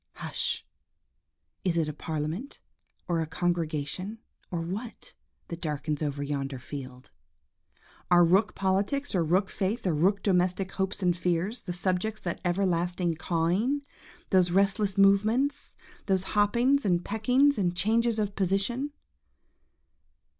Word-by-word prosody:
Hush! - - -2 1.0
is 175 -3 +1
it 160 -2 +2
a 150 - -3
parliament, 160 - -4 0.5
or 170 -2 +1
a 160 - -2
congregation, 170 +3 -2 0.3
or 170 -2 -2
what, 200 +8 -6 0.4
that 170 0 -6
darkens 150 -2 -2
over 145 -1 -2
yonder 140 -1 -3
field? 130 0 -9 1.0
Are 175 -1 +7
rook 195 +6 +3
politics, 200 +9 0
or 180 -3 +2
rook 180 +4 +1
faith, 205 +4 -2
or 180 - +2
rook 190 +7 +2
domestic 185 0 +1
hopes 190 0 -2
and 175 -1 +3
fears, 180 +6 -1
the 180 - -5
subjects 185 +4 -1
of - - -26
that 170 - -3
everlasting 175 -1 0
cawing, 185 - 0 0.5
those 185 -2 +4
restless 195 +2 +2
movements, 215 +8 +3 0.3
those 190 -2 +2
hoppings 240 +7 +3
and 175 -3 +1
peckings, 250 +6 +3
and 175 -2 +1
changes 230 +3 +2
of 205 -2 -1
position? 205 +9 0
185 Hz, 130 wpm, -28 LUFS, 170-210 Hz, 1.0 s, Are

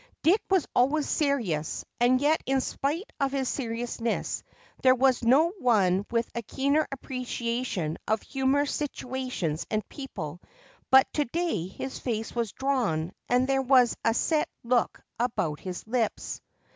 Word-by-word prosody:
Dick 375 +7 +4
was 380 -4 +3
always 280 +4 +3
serious 230 - 0
and 245 +2 +4
yet 300 +3 +3
in 270 0 +3
spite 295 - -2
of 275 -1 +1
his 270 -2 -1
seriousness 235 -2 -2 0.4
there 255 -1 +6
was 260 -1 +3
no 270 +8 +5
one 200 - +3
with 235 -1 0
a 235 - -2
keener 280 +7 +1
appreciation 245 - -3
of 215 0 +1
humorous 270 +1 +1
situations 255 - -3
and 215 0 -1
people, 180 - -7 0.5
but 265 0 +7
to 295 - +1
day 320 - -1
his 265 +7 -6
face 225 -3 -3
was 235 -4 -1
drawn 220 - 0 0.2
and 250 +1 +3
there 270 0 +2
was 255 -2 +5
a 225 - +2
set 310 +4 +1
look 240 0 +1 0.2
about 175 -11 -1
his 185 -1 -6
lips. 230 -1 -2
250 Hz, 145 wpm, -27 LUFS, 225-275 Hz, 0.5 s, but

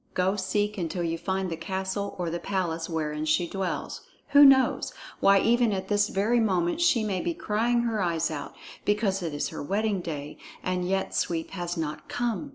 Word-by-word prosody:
Go 185 +2 +2
seek 205 +1 -1
until 175 +1 -2
you 165 0 -2
find 190 -1 -2
the - - -1
castle 190 +3 -3
or 175 -2 -2
the 170 - -2
palace 170 -3 -2
wherein 155 -2 -2
she 155 +3 +2
dwells. 190 0 -3 0.3
Who 285 0 +8
knows 270 -2 +5 0.3
why, 195 -1 +5
even 240 -1 +3
at 190 -1 -3
this 205 0 +3
very 215 +5 +2
moment 185 - +1
she 340 -10 +4
may 195 -4 -1
be 170 -1 -2
crying 235 +3 +1
her 225 -3 -1
eyes 165 -2 0
out, 145 -2 -6 0.3
because 205 -2 +1
it 165 -2 -3
is 145 - -2
her - - -6
wedding 200 +5 0
day, 150 -4 -6 0.2
and 180 -1 -1
yet 190 0 -1
Sweep 165 -2 -1
has 175 -2 -4
not 155 -2 -4
come!" 240 +4 -2
190 Hz, 190 wpm, -27 LUFS, 170-210 Hz, 0.3 s, Who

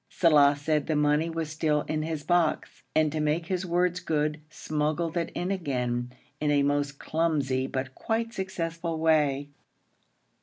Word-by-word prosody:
Saleh 145 -4 +5
said 150 0 0
the 155 - +1
money 150 +2 +2
was 165 -2 -3
still 155 -2 +1
in 155 0 -2
his 155 -1 -3
box, 175 -2 0
and 155 -1 +3
to 155 - -2
make 155 +2 0
his 185 +1 -2
words 180 +1 +1
good 155 -3 -1
smuggled 155 +2 -2
it 170 -1 -1
in 180 +2 -2
again, 125 -9 -2 0.3
in 150 - 0
a 145 -1 +3
most 145 0 0
clumsy 145 -6 0
but 135 0 -4
quite 230 - -2
successful 170 -4 -3
way. 145 -3 +2
155 Hz, 155 wpm, -27 LUFS, 145-165 Hz, 0.3 s, Saleh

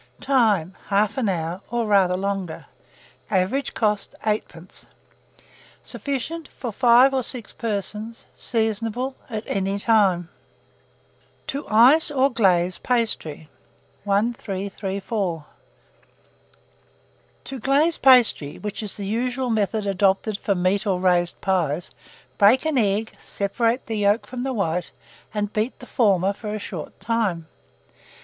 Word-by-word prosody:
Time. 215 - +2
1/2 210 +3 +1
hour, 170 0 -3
or 235 0 -1
rather 195 -3 +3
longer. 195 -3 -3 0.6
Average 200 +8 0
cost, 210 -2 -1
8d. 200 -5 -4 1.0
Sufficient 295 +4 -4
for 245 -4 -6
5 245 +3 +5
or 265 - +1
6 240 -3 -5
persons. 215 +1 -4
Seasonable 225 +3 -1 0.2
at 220 -2 -4
any 195 0 -1
time. 200 -6 +2 1.2
TO 280 +2 -5
ICE 255 +10 +6
OR 275 -1 +2
GLAZE 185 -6 +2
PASTRY. 215 - -1 0.6
1334. 200 -4 -2 2.0
To 270 - -7
glaze 285 +7 +3
pastry, 245 - +4
which 210 +1 -5
is 210 -2 -4
the 200 - -5
usual 245 +4 -1
method 215 -1 0
adopted 195 +2 +1
for 200 - 0
meat 190 +4 0
or 185 -2 +1
raised 180 -1 +2
pies, 175 -3 0 0.5
break 215 +8 +5
an 310 -4 +1
egg, 210 0 0
separate 230 +5 -1
the 225 -1 -3
yolk 205 +2 +2
from 250 -1 -6
the 265 +1 -2
white, 180 -5 -1 0.4
and 210 -1 -3
beat 220 +4 -1
the 250 - -12
former 200 -6 +2
for 210 +1 -7
a - - -2
short 185 -6 -7
time. 210 -8 -1
210 Hz, 120 wpm, -23 LUFS, 190-240 Hz, 2.0 s, ICE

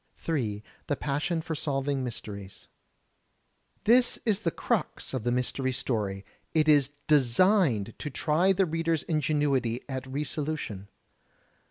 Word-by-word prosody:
J. 110 -10 -1 0.2
The 145 - +1
Passion 150 +5 -1
for 165 - -3
Solving 140 -3 -1
Mysteries 100 -5 -7 1.2
This 240 +4 +4
is 215 -3 +2
the 210 - 0
crux - - -2
of 130 -4 -2
the 120 - +1
mystery 125 +1 0
story. 105 -6 -2 0.3
It 155 -1 +3
is 145 -2 +4
designed 140 - +3
to 150 - -4
try 160 +6 +2
the 190 0 +3
reader's 165 -1 0
ingenuity 145 -6 0
at 130 -1 -4
re 145 +3 -1
solution. 140 -10 -4
140 Hz, 130 wpm, -28 LUFS, 125-160 Hz, 1.2 s, This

